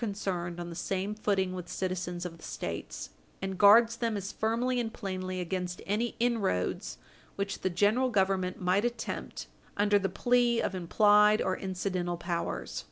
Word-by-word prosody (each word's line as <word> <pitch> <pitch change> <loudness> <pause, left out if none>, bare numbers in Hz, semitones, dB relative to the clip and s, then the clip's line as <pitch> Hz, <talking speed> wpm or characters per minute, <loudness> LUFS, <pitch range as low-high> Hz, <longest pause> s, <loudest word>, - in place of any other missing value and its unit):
451 205 -3 -2 0.3
concerned, 175 0 -6
on 175 0 -5
the - - -7
same 195 +3 -2
footing 195 -3 0
with 180 -1 -6
citizens 180 -1 -3
of 170 -2 -5
the - - -16
States, 60 -1 -5 0.3
and 190 -1 -4
guards 225 +3 +7
them 230 -3 -1
as 195 0 -4
firmly 240 +3 0
and 225 -2 -2
plainly 185 -4 -4
against 180 0 -3
any 225 +4 -1
inroads 195 - 0 0.4
which 200 0 -3
the 185 - +1
General 210 +8 +2
Government 190 -4 +1
might 185 +3 +2
attempt 240 -1 -4 0.3
under 205 0 +4
the 195 -1 -1
plea 240 +4 +2
of - - -1
implied 210 +4 +4
or 185 - 0
incidental 185 -2 -2
powers. 170 0 -3
195 Hz, 165 wpm, -30 LUFS, 180-215 Hz, 0.4 s, guards